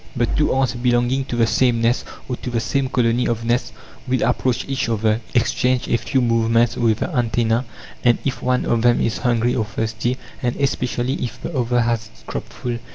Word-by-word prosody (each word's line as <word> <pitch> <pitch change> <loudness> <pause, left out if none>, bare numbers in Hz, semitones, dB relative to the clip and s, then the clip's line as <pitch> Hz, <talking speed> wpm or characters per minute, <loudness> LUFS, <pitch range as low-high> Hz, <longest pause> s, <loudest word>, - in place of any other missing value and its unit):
But 120 -2 0
two 150 - +2
ants 130 -3 +1
belonging 120 +2 +1
to 125 - -4
the 115 -1 +3
same 120 +1 +2
nest 115 +2 +1 0.2
or 125 - -2
to - - -6
the 120 -1 0
same 130 +4 -1
colony 120 -1 +1
of 115 0 -2
nests 120 +1 0 0.4
will 130 0 +1
approach 125 0 0
each 135 -3 -1
other, 110 0 +1
exchange 125 +1 +1
a 120 - +2
few 130 +3 0
movements 115 0 +2
with 115 -2 +1
the 170 - -2
antennae, 115 0 +1 0.4
and 120 -1 +4
"if 135 -3 -2
one 125 0 +1
of 115 -1 +1
them 120 0 +4
is 115 - 0
hungry 120 -1 +1
or 110 - 0
thirsty, 110 +4 -2 0.2
and 120 -2 0
especially 130 -1 -1
if 120 -4 -5
the 170 - -5
other 120 -1 +1
has 115 -1 0
its 110 - -21
crop - - -5
full 120 -1 -4
120 Hz, 205 wpm, -21 LUFS, 115-125 Hz, 0.4 s, and